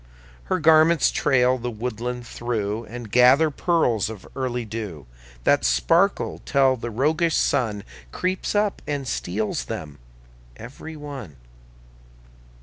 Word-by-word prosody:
Her 185 - 0
garments 160 0 +5
trail 130 -1 +2
the 120 +1 -3
woodland 120 +1 -4
through, 115 -2 -3
And 115 -2 -9
gather 130 +6 +5
pearls 135 - +1
of 110 -4 -9
early 125 -3 -2
dew 105 - -6 0.4
That - - +3
sparkle - - +2
till 135 -1 +3
the 120 -1 -6
roguish 155 +8 +1
Sun 110 -7 0 0.3
Creeps 185 +3 -2
up 205 -1 +1
and 145 -2 -3
steals 105 - -2
them 75 +2 -7 0.6
every 140 +7 -9
one. 140 - -8
125 Hz, 120 wpm, -23 LUFS, 110-145 Hz, 0.6 s, garments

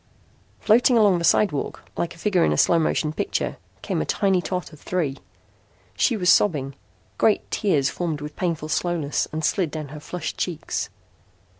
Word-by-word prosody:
Floating 240 +3 +4
along 205 -5 +4
the - - -4
sidewalk 165 -3 +1
like 170 - -3
a - - -17
figure 185 0 +2
in - - +3
a 75 - 0
slow 170 - +4
motion 155 -1 0
picture - - -2 0.3
came - - -1
a - - +1
tiny 190 - +1
tot 180 -2 -4
of 150 - -13
three. 155 -7 -2 0.8
She 235 - +2
was 180 -3 -2
sobbing. 140 -8 +2 0.5
Great 220 - +2
tears 155 -10 +1
formed 165 -4 -3
with 150 0 -7
painful 165 -4 -2
slowness 160 -3 0
and 155 0 -2
slid 180 -2 +1
down 155 -2 -6
her 150 +2 -8
flushed 160 +1 -6
cheeks. 175 -4 -3
170 Hz, 170 wpm, -23 LUFS, 150-185 Hz, 0.8 s, Floating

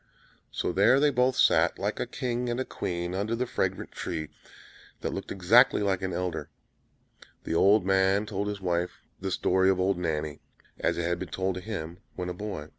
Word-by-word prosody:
So - - -1
there 100 +9 +5
they 145 0 +4
both 125 0 +2
sat, - - +4
like - - -2
a - - -1
king 125 -1 -2
and 120 +1 -1
a 130 - -1
queen, 85 0 -3
under 105 +4 -1
the 125 +2 -1
fragrant - - -2
tree, 80 -2 -4 0.7
that - - -2
looked - - -6
exactly 105 +5 +5
like 95 -2 0
an 95 -1 -2
elder: 90 0 -3 0.9
the - - -3
old 100 +3 +4
man 95 +1 +3
told 100 -1 -3
his 105 -1 -4
wife 90 -1 -2 0.2
the 95 - -3
story 95 +1 +2
of 95 -1 +2
"Old 95 0 +1
Nanny," 75 -3 -2 0.4
as - - 0
it 85 - -1
had 85 +1 -1
been 95 - -5
told 95 +2 -1
him 90 -4 -6 0.2
when 90 0 -4
a - - -3
boy. 90 -5 -6
95 Hz, 190 wpm, -28 LUFS, 90-105 Hz, 0.9 s, there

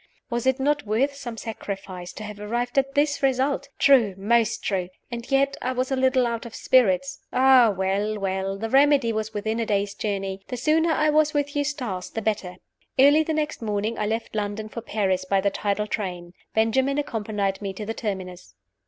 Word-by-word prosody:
Was 235 +1 -1
it 260 +1 +2
not 295 -2 0
worth 255 +7 +1
some 240 -5 -7
sacrifice 195 -5 -6
to 215 - -8
have 210 -1 -8
arrived 240 +5 0
at 275 0 -2
this 290 0 +2
result! 270 +1 +1
True 240 -9 +5
most 225 +3 +1
true! 185 -3 -1 0.2
And 235 -1 -6
yet 275 0 +2
I 255 - -1
was 255 +1 -2
a - - +2
little 260 -1 +3
out 230 -1 -2
of 230 - -11
spirits. 185 -8 +2
Ah, 255 -2 +6
well! 200 +2 -1
well! 195 0 -2
the 225 +3 -3
remedy 275 -1 +4
was 220 0 -2
within 220 +2 -2
a 230 - 0
day's 200 -1 0
journey. 195 -2 -3
The 250 - -4
sooner 320 +6 +2
I 305 -1 +2
was 305 0 +3
with 285 0 -1
Eustace 265 -11 -2
the - - -4
better. 200 -4 -2 0.4
Early 285 +4 +6
the 315 0 -1
next 305 -3 -2
morning 215 +1 -2
I 210 - 0
left 225 +1 -3
London 210 0 -3
for 230 - -6
Paris 190 -4 0
by 195 +1 +1
the 200 +1 +1
tidal 205 +1 -1
train. 180 -5 -4 0.2
Benjamin 260 +5 +2
accompanied 210 -8 -2
me 200 -1 -3
to 210 +2 -6
the 225 - -3
Terminus. 185 - -6
225 Hz, 195 wpm, -24 LUFS, 200-265 Hz, 0.4 s, Ah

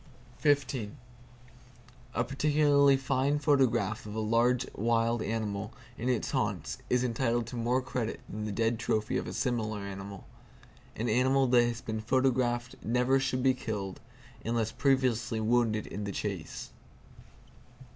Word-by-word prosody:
A 120 - +2
particularly 140 +1 +4
fine 135 +2 +1
photograph 130 -9 +2
of 105 - -7
a - - -1
large 115 +3 +2
wild 115 +1 +1
animal 105 -1 -3 0.2
in 120 +3 -2
its 125 - 0
haunts - - -2
is 125 0 +2
entitled 120 -1 0
to 120 - -8
more 120 +2 +1
credit 125 -3 -3
than 105 +1 -5
the 105 - -3
dead 115 +2 0
trophy 110 -2 0
of - - -3
a - - -5
similar 110 -4 -1
animal. 100 0 -7 0.7
An 115 - -2
animal 130 +4 +3
that 120 -1 +5
has 120 -1 -3
been 110 -1 -4
photographed 120 0 +1
never 125 +3 +2
should 130 -1 -1
be 130 -1 +5
killed, 105 -6 -4 0.4
unless 115 -1 0
previously 130 -5 +1
wounded 110 -1 +2
in 100 +1 -5
the 100 - -3
chase. - - -5
120 Hz, 135 wpm, -30 LUFS, 110-130 Hz, 0.7 s, that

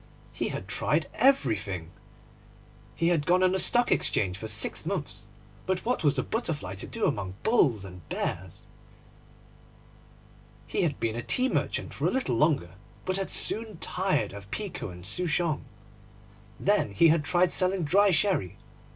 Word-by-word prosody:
He - - -2
had - - -5
tried - - 0
everything. 105 - +1 1.0
He 165 +1 +1
had 165 -4 +1
gone 180 +1 +4
on 185 - +4
the 190 - +1
Stock 240 +4 +5
Exchange 90 -3 +1
for 110 +3 -6
six 105 -1 +1
months; - - -3 0.4
but 185 -1 -1
what 245 -5 0
was 145 -2 +2
a 130 - +1
butterfly 155 - -3
to 95 - -6
do - - -2
among 95 -2 -2
bulls 125 - +2
and 90 -1 -10
bears? - - -4 2.0
He - - -2
had 155 -6 -1
been 115 -1 -1
a 120 - -3
tea 255 - +1
merchant - - -2
for - - -1
a - - +1
little 255 - 0
longer, 135 - +1 0.3
but 185 0 -1
had 195 - -3
soon 220 -3 0
tired 180 - 0
of 100 -1 -10
pekoe 180 - -5
and 90 0 -9
souchong. 165 - 0 0.9
Then 100 - +1
he 160 +12 +5
had 160 -1 +3
tried 175 +3 +2
selling 185 -1 +2
dry 200 +7 +4
sherry. 155 - +1
160 Hz, 160 wpm, -27 LUFS, -, 2.0 s, Stock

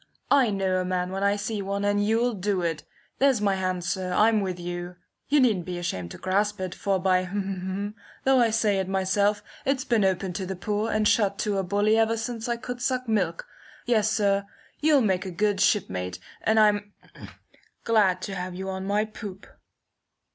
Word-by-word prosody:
"I 270 -5 +5
know 195 -2 0
a - - -1
man 180 0 -2
when 195 +1 -3
I 200 0 +3
see 205 +1 -3
one, 200 +1 -2
and 205 0 +2
you'll 230 +3 +2
do 195 -2 -1
it. 165 -3 -1 0.4
There's 270 -4 +4
my 205 -1 +2
hand, 185 -2 -2
sir! 185 +1 -2
I'm 215 +3 +4
with 185 -2 -3
you! 175 0 -5 0.3
You 295 +1 +4
needn't 215 -10 +2
be 180 -1 -3
ashamed 95 - -3
to - - -9
grasp 205 +2 0
it, 185 -1 -3
for 195 +1 0
by, 185 -1 +1 0.9
though 265 -1 +4
I 235 -2 +4
say 215 -3 +2
it 190 - -2
myself, 200 +2 +1 0.2
it's 265 -1 0
been 230 -4 +2
open 190 -1 0
to 185 +1 -4
the 190 - -4
poor 210 +3 -2
and 215 0 +2
shut 200 -3 +2
to 205 -2 0
a - - 0
bully 205 +4 +2
ever 225 0 +2
since 225 +1 -4
I 235 - 0
could 245 0 -6
suck 255 0 -1
milk. 225 - 0 0.4
Yes, 220 -3 +2
sir, 200 -2 +1 0.3
you'll 300 -2 +4
make 190 -3 0
a - - -3
good 205 +3 0
ship 205 0 +3
mate, 90 0 -4 0.2
and 220 0 +3
I'm 205 -1 +3 0.9
glad 195 -5 +2
to 200 - -4
have 180 -1 -5
you 190 +1 -5
on 190 0 -5
my 205 +2 +1
poop." 205 -3 -9
200 Hz, 200 wpm, -26 LUFS, 185-220 Hz, 0.9 s, I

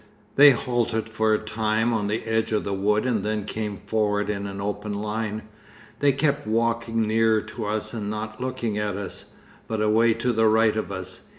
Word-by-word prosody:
They 145 +1 +9
halted 120 -3 0
for 110 0 0
a - - +2
time 110 +2 0
on 105 -2 0
the 110 +2 -2
edge 110 0 0
of 105 - +1
the 100 - -2
wood 105 +4 +1
and 115 -6 0
then 105 -1 -2
came 105 -2 -4
forward 105 -1 0
in 100 -1 -3
an 100 0 -6
open 105 +1 -3
line. 105 +1 -3 0.6
They 145 -1 +4
kept 145 0 0
walking 115 0 +1
nearer 110 0 +3
to 110 - -6
us 105 +1 -2
and 105 -3 -4
not 110 +3 -5
looking 120 -4 -2
at 105 -2 -2
us, 100 -2 -7 0.4
but 110 -1 -2
away 110 +2 +3
to 120 +2 0
the 110 0 +3
right 110 0 +4
of 110 -2 -3
us. 95 -1 -7
110 Hz, 195 wpm, -24 LUFS, 105-115 Hz, 0.6 s, They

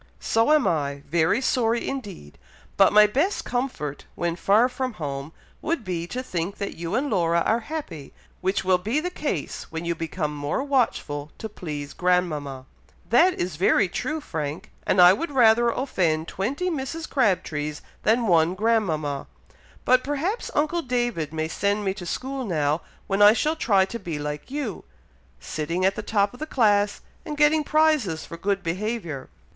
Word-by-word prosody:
"So 225 +5 +2
am 305 -3 +4
I, 140 -3 -1
very 165 - +2
sorry 235 -3 +1
indeed; 200 - -7 0.4
but 195 - +5
my 210 0 +8
best 285 - 0
comfort, 245 - -3
when 170 -1 -1
far 210 +7 +4
from 255 -1 -3
home, 140 -4 -5 0.3
would 320 -6 -1
be, 175 -3 -3
to 250 +7 -4
think 180 -3 -3
that 200 - -4
you 170 +4 -3
and 270 +4 +1
Laura 170 -7 +2
are 225 +7 +2
happy, 235 - -6 0.3
which 190 +1 0
will 185 -1 +4
be 220 +11 0
the 360 +3 -3
case 285 - -4
when 165 +1 -4
you 170 - 0
become 160 -2 -3
more 145 - -2
watchful 195 - -1
to 220 - -5
please 150 -8 -6
grandmama." 155 -7 0 0.5
"That 350 +10 +5
is 175 -3 -3
very 190 +2 +3
true, 310 - -3
Frank! 155 - -5 0.2
and 185 - +2
I 180 +1 +9
would 330 - -3
rather 240 -3 +5
offend 170 - 0
twenty 280 - -2
Mrs. 315 +2 -4
Crabtrees 155 - 0 0.2
than 230 +2 +2
one 170 -2 +3
grandmama; 170 -11 0 0.6
but 255 0 +4
perhaps 305 - -2
uncle 310 +4 +1
David 240 - -1
may 160 0 -2
send 200 +5 -1
me 190 - +1
to 185 -3 -8
school 265 +7 -3
now, 155 -6 0 0.2
when 195 +1 0
I 205 +1 +9
shall 305 +7 0
try 200 -11 +3
to 235 +4 -6
be 170 -7 -4
like 150 0 -5
you, 270 -7 -4 0.6
sitting 165 - -2
at 190 - +3
the - - -3
top 205 -1 +1
of 245 - -13
the 310 - -4
class, 205 -7 +2 0.2
and 300 -3 -6
getting 300 +1 +4
prizes 300 - +2
for - - -8
good 195 +3 -1
behaviour." 175 - -3
200 Hz, 170 wpm, -24 LUFS, 165-255 Hz, 0.6 s, I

